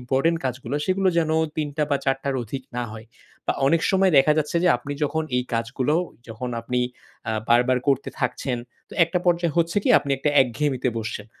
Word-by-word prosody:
important 135 +7 +1
কাজগুলা, 130 +2 -3
সেগুলো 190 0 +2
যেন 160 -2 +1 0.3
৩ 150 -1 -1
টা 155 - +1
বা 140 - +3
৪ 135 -1 +2
টার 140 -1 -1
অধিক 130 +4 -6
না 125 - 0
হয়। 110 0 -10 0.4
বা - - +2
অনেক 165 +3 +3
সময় 190 -2 +3
দেখা 135 +3 +5
যাচ্ছে 155 +2 0
যে - - +5
আপনি 130 +4 -6
যখন 160 +2 -1
এই 125 - +1
কাজগুলো 125 +5 0 0.3
যখন 115 +3 -5
আপনি 125 +2 -1 0.5
আ - - 0 0.2
বারবার 125 +2 +4
করতে 140 -1 +2
থাকছেন, 125 0 -1 0.3
তো - - -16
একটা 170 +2 -1
পর্যায় 170 -2 +2
হচ্ছে 170 +1 +1
কি - - 0
আপনি 140 - -6
একটা 145 +2 +1
একঘেয়েমিতে 130 +1 -1
বসছেন। 110 -2 -5
135 Hz, 195 wpm, -24 LUFS, 125-160 Hz, 0.5 s, দেখা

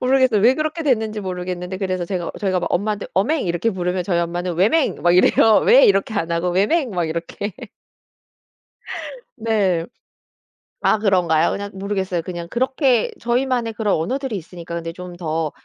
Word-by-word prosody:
모르겠어요. 255 -4 +3
왜 240 +5 +5
그렇게 310 +2 -2
됐는지 220 -7 0
모르겠는데 180 -1 -4
그래서 185 -2 -2
제가 180 -3 -3
저희가 185 -3 0
막 - - -3
엄마한테 205 +2 -1
"어맹." 245 - +1
이렇게 175 +6 0
부르면 180 -2 -2
저희 175 -2 0
엄마는 175 +1 -2
"왜맹?" 225 - +2
막 175 0 +4
이래요. 215 +3 +5
"왜?" - - +7
이렇게 285 - +2
안 170 -5 -1
하고 170 +2 0
"왜맹?" 230 - +1
막 175 -4 -1
이렇게. 170 +5 -4 1.8
네. 200 -7 0 1.0
아 220 - +3
그런가요? 175 -6 +2
그냥 200 0 -4
모르겠어요. 190 -2 -2
그냥 170 0 -6
그렇게 260 -1 +1
저희만의 240 -1 0
그런 210 -2 0
언어들이 255 - -2
있으니까 170 -2 -7
근데 165 0 -4
좀 180 0 -9
더 160 -2 -2
195 Hz, 375 characters per minute, -20 LUFS, 175-230 Hz, 1.8 s, 왜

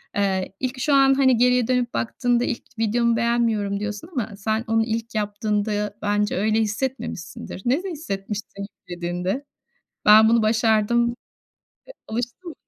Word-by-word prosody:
Eee, 195 -2 0
ilk 255 0 -3
şu 285 +3 +1
an 270 -1 +6
hani 265 -2 +4
geriye 250 0 +3
dönüp 250 -1 0
baktığında 240 +1 0
"İlk 245 - -3 0.2
videomu 230 +1 +2
beğenmiyorum." 225 -4 +1
diyorsun 210 +6 -5
ama 235 - -3
sen 220 +2 -1
onu 225 0 +2
ilk 230 0 -4
yaptığında 210 0 -1
bence 205 -1 0
öyle 215 +2 +2
hissetmemişsindir. 220 -5 -4
Nasıl 290 +11 +1
hissetmişsin 205 - -5
yüklediğinde? 180 +8 -4 0.6
Ben 215 +1 +8
bunu 230 -1 +4
başardım. 225 +2 +2 0.7
E, - - -9 0.2
alıştım. 245 +10 -5
225 Hz, 135 wpm, -23 LUFS, 210-245 Hz, 0.7 s, Ben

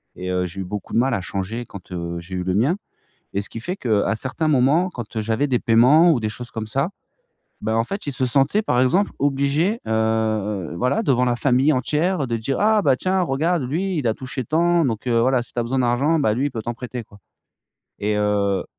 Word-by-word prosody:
et 90 0 -5
heu, 90 0 0
j'ai 95 +2 -6
eu - - -3
beaucoup 105 +3 -6
de - - +1
mal 130 +1 +2
à 95 - -1
changer 100 +6 -4
quand, 95 -3 -12
heu, 85 -1 -4
j'ai 90 +2 -8
eu 90 - -2
le 90 0 -1
mien 130 - +2 0.6
et 100 - 0
ce 105 - -9
qui 115 - -7
fait, 180 +10 -3
qu'à 110 -2 +1
certains 135 +7 -3
moments, 155 +6 +3
quand, 120 -7 -8
heu, 110 - 0
j'avais 115 +6 0
des 125 -3 +1
paiements 130 +10 +5
ou 125 - 0
des 110 - -1
choses 120 +2 -8
comme 110 -1 -5
ça, 135 - 0 0.7
bah, 110 +1 0
en 115 - +2
fait, 195 - -5
il 145 - -2
se 130 - -1
sentait, 140 - +2
par 125 - +1
exemple, 180 +11 +2
obligé, 145 - +1
heu, 110 -4 0
voilà, 125 - +1
devant 125 - +2
la 120 - +1
famille 135 +4 +3
entière 150 +4 0
de 115 - -1
dire: 130 +5 -2
«Ah, 215 +1 +4
bah, 135 -5 +3
tiens, 185 +4 0
regarde 165 +1 0
lui, 175 +7 -1
il 135 - -2
a 110 - +1
touché 130 -1 -5
tant, 170 +2 +2
donc 115 -1 -2
heu, 115 -1 +2
voilà, 130 0 +2
si 120 - -13
tu - - -6
as - - +2
besoin 125 +3 -1
d'argent, 130 +7 +2
bah, 140 -8 +2
lui, 135 +4 0
il - - -2
peut 115 -3 -5
t'en 120 +2 -4
prêter 125 0 -6
quoi» 100 - -18 0.8
et 105 +1 0
heu, 100 -2 +1
125 Hz, 240 wpm, -22 LUFS, 110-145 Hz, 0.8 s, paiements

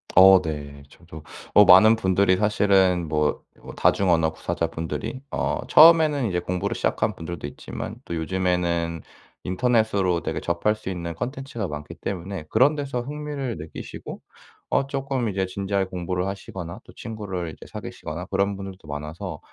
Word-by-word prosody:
어 95 0 +9
네. 75 -2 -6
저도 80 -1 -13 0.3
어 105 - +9
많은 100 +4 +8
분들이 95 -3 +2
사실은 95 -4 +3
뭐 75 0 0 0.2
뭐 - - -9
다중 100 -2 +2
언어 80 -2 +3
구사자분들이 80 - -4
어 - - -1
처음에는 155 -5 +7
이제 90 -3 0
공부를 90 0 -2
시작한 - - 0
분들도 80 -3 -6
있지만 - - -7
또 - - -6
요즘에는 85 -1 -1 0.4
인터넷으로 100 -3 +1
되게 - - -3
접할 85 +5 0
수 110 -3 -7
있는 85 -2 -4
콘텐츠가 130 - -4
많기 75 0 -7
때문에 95 -1 -5
그런 130 +7 +4
데서 140 -4 -3
흥미를 145 -2 -4
느끼시고 80 +1 -8 0.5
어 - - +2
쪼끔 135 -3 -2
이제 95 -1 -1
진지하게 95 +1 -1
공부를 90 0 -3
하시거나 95 -3 -6
또 - - -15
친구를 95 -7 -5
이제 - - -13
사귀시거나 85 +4 -6
그런 100 +1 0
분들도 95 -2 -9
많아서 75 +4 -6
95 Hz, 355 characters per minute, -24 LUFS, 85-110 Hz, 0.5 s, 어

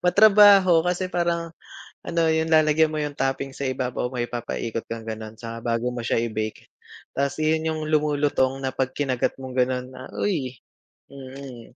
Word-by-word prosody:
Matrabaho, 195 -2 +7
kasi 180 +1 -1
parang 170 -2 -1 0.5
ano, 170 0 0
yung 160 0 +1
lalagyan 155 0 +4
mo 155 - -6
yung 145 -1 -5
toppings 135 0 -2
sa 140 - -1
ibabaw, 125 -1 -2
may 120 - 0
ipapikot 115 -1 -4
kang 115 -1 -6
gano'n, 110 0 -7
saka 115 0 -7 0.2
bago 120 +2 -1
mo 125 - -5
siya 115 - +1
i-bake. 110 -2 -4 0.4
Ta's 140 0 -1
iyon 160 +1 +1
yung 155 - -4
lumulutong 145 -3 +1
na 130 - -1
'pag 130 0 -2
kinagat 130 -4 0
mong 130 0 -4
gano'n, 125 0 +1
ah, 130 0 -10
uy! 140 -11 -1 0.6
Mm, 130 -3 -10
135 Hz, 165 wpm, -24 LUFS, 125-160 Hz, 0.6 s, Matrabaho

